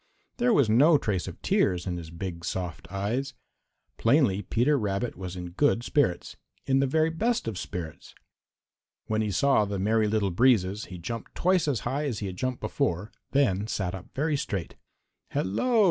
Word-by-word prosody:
There 245 0 +3
was 140 - +4
no 145 +9 +6
trace 105 -9 -2
of - - -8
tears 90 -1 +2
in 90 -2 -2
his 85 -2 -8
big, 85 0 -6
soft 85 -2 -4
eyes. 120 +8 -2 0.6
Plainly 115 -5 +3
Peter 120 +9 +2
Rabbit 105 -1 -1
was 90 0 -6
in 90 -1 -6
good 120 +3 +2
spirits, 120 -11 0 0.3
in 135 0 +3
the 135 - +2
very 160 +4 +2
best 225 - 0
of 110 - -2
spirits. 90 -4 -7 0.9
When 110 0 0
he 105 - -1
saw 135 +3 +3
the 100 -1 -3
Merry 110 +3 +2
Little 105 -2 +1
Breezes 105 -1 +3
he 90 - -9
jumped 115 +6 -6
twice 180 -2 +2
as 135 -6 0
high 145 +3 -2
as 125 -7 -2
he 100 - -4
had 95 -2 -5
jumped 130 +5 -3
before, 105 -1 -1 0.2
then 105 -8 +2
sat 95 -5 -2
up 95 0 -8
very 150 +2 +1
straight. 100 - -3 0.5
"Hello!" 230 - +1
110 Hz, 175 wpm, -27 LUFS, 95-135 Hz, 0.9 s, no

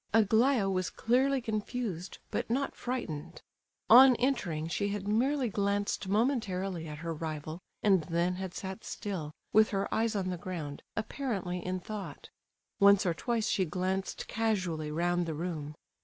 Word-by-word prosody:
Aglaya 225 +1 +4
was 185 -1 0
clearly 265 +4 +2
confused, 215 -5 -3
but - - -2
not 270 +4 0
frightened. 170 - -5 0.4
On 255 +2 +9
entering 200 - 0
she 200 +4 -1
had 205 0 -3
merely 255 +5 +2
glanced 200 -1 -1
momentarily 195 - 0
at 150 -1 -6
her 165 - -1
rival, 155 0 -5 0.2
and 190 -6 +4
then 170 +1 +1
had 190 -2 -5
sat 190 +3 -6
still, 180 -8 -4 0.2
with 215 0 +6
her 195 -1 -1
eyes 225 0 +1
on 185 -2 -1
the 180 - -3
ground, 165 -6 -5
apparently 215 -6 -3
in 185 0 -2
thought. 205 +2 -7 0.5
Once 200 0 +6
or 175 - +2
twice 225 +5 -1
she 190 - +2
glanced 185 +3 -2
casually 185 -9 -1
round 175 +2 0
the 160 - -3
room. 155 -3 -4
195 Hz, 150 wpm, -31 LUFS, 175-220 Hz, 0.5 s, On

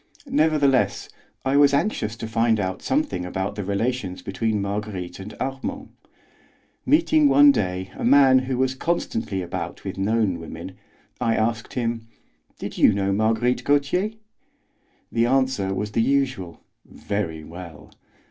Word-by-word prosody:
Nevertheless 145 -4 +2 0.4
I 135 +1 +2
was 140 -1 +5
anxious 130 - -1
to 115 0 -6
find 115 0 +2
out 95 -1 -2
something 295 - -1
about 95 +2 -3
the 105 -1 -5
relations 100 -1 -2
between 105 +3 -1
Marguerite 100 -3 -4
and 95 +2 -8
Armand. 200 - -4 1.0
Meeting 305 -1 +4
one 285 0 +7
day 95 - -2
a - - -6
man 135 0 +6
who 130 0 -3
was 130 0 +1
constantly 115 - -2
about 85 - -5
with - - -5
known 100 -3 +1
women, 80 - -8 0.5
I 115 - +1
asked 115 0 -1
him: 115 -2 -2 0.5
"Did - - -6
you - - +6
know 100 0 0
Marguerite 110 +4 +1
Gautier?" 145 +9 +1 1.0
The 115 0 +2
answer 130 -7 +1
was 105 +2 -3
the 115 - +1
usual: 130 -9 -1 0.2
"Very 85 -6 -4
well." 85 -1 -11
115 Hz, 140 wpm, -23 LUFS, 95-135 Hz, 1.0 s, one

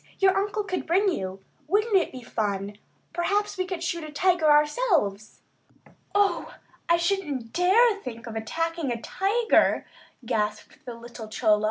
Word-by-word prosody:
"Your 385 -1 +4
uncle 410 +2 0
could 370 -2 -4
bring 385 +5 +3
you. 190 - -5 0.2
Wouldn't 420 +5 +2
it 375 - +3
be 255 -2 -9
fun! 205 -2 -3 0.3
Perhaps 405 +4 0
we 370 -1 -1
could 365 -3 -4
shoot 335 -1 -2
a 310 - -7
tiger 345 0 +2
ourselves!" 295 - +2 0.7
"Oh, 400 -4 +1 0.3
I 340 - +5
shouldn't 320 -10 -2
dare 360 +2 +3
to 480 +1 +7
even 405 -1 -6
think 230 -3 -7
of 230 -2 -7
attacking 330 +6 -2
a 235 - -2
tiger," 425 - +2 0.4
gasped 210 +6 -3
the 245 - -6
gentle 230 - -13
little 235 -1 -9
Chola. 215 -1 +2
330 Hz, 165 wpm, -26 LUFS, 230-390 Hz, 0.7 s, to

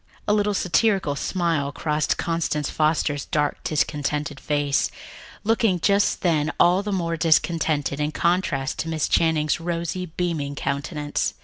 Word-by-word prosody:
A 205 - +3
little 210 -1 +1
satirical 190 -4 +2
smile 165 -4 -1
crossed 150 0 -1
Constance 165 -3 -1
Foster's 150 -2 0
dark, 145 -1 -1
discontented 150 -1 -1
face, 145 -2 0 0.5
looking 220 -4 +2
just 200 +3 +2
then 160 -3 +2
all 180 +2 +5
the 205 0 -4
more 170 -3 -1
discontented 160 -3 +1
in 150 +1 0
contrast 165 -6 0
to 165 - -2
Miss 160 -2 0
Channing's 155 -2 +2
rosy, 170 +2 -3
beaming 160 -4 -3
countenance. 145 +2 -2
160 Hz, 130 wpm, -23 LUFS, 145-175 Hz, 0.5 s, all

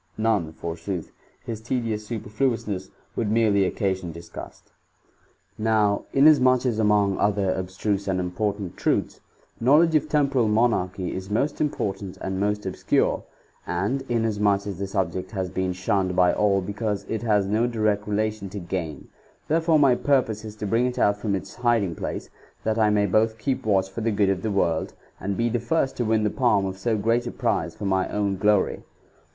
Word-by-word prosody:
None, 110 -7 +1
forsooth; 85 +2 -5 0.3
his 110 -2 -5
tedious 110 -3 -2
superfluousness 105 -3 -2 0.3
would 110 - -1
merely 105 -4 +3
occa 100 -3 0
sion 90 -2 -7
disgust. 85 +1 -10 0.4
'' - - -38
2. 110 - -6
Now, 105 -2 +2
inasmuch 135 -3 +5
as 115 -3 0
among 105 -2 +2
other 100 -2 +2
abstruse 95 +2 -2
and 95 -1 0
important 100 +1 -3
truths, - - 0 0.4
knowledge 150 +7 +5
of 155 0 +2
temporal 140 -6 +2
Monarchy 105 -5 +1
is 95 +1 -6
most 120 +8 0
important 100 -10 -2
and 95 0 -3
most 105 +1 -1
obscure, 95 - +1 0.5
and 100 +10 -1
inasmuch 105 -4 +1
as 100 -3 -5
the 100 - -2
subject 95 -2 -2
has 95 -3 -3
been 95 -1 -1
shunned 95 0 0
by 90 -1 +4
all 100 -2 +2
because 105 +1 -3
it 110 - -3
has 105 -4 +2
no 110 +4 +1
direct 110 -3 0
relation 105 -1 -1
to 100 - -7
gain, 85 -3 -5 0.4
therefore 160 0 +3
my 140 -4 +5
purpose 120 -5 +1
is 105 -1 -8
to 105 - -5
bring 115 +5 +2
it 125 - -4
out 100 0 +3
from 105 -1 -1
its 95 0 -6
hiding 115 -7 +1
place, - - -5 0.3
that 110 0 0
I 110 -1 +4
may 105 -1 +3
both 110 +3 +2
keep 125 +1 -2
watch 95 -2 +3
for 95 +4 -6
the 115 - +1
good 100 -2 +2
of 95 -2 0
the 110 - -2
world, 85 -5 0 0.2
and 100 0 -3
be 115 - +1
the 120 +1 0
first 135 +3 0
to 120 - 0
win 110 0 +2
the 105 - +1
pidm 110 -7 +2
of 95 0 -5
so 110 +2 0
great 115 +3 +1
a - - -3
prize - - -1
for 100 - -6
my 95 -1 +1
own 100 -2 -1
glory.' 105 0 +2
105 Hz, 185 wpm, -24 LUFS, 95-115 Hz, 0.5 s, inasmuch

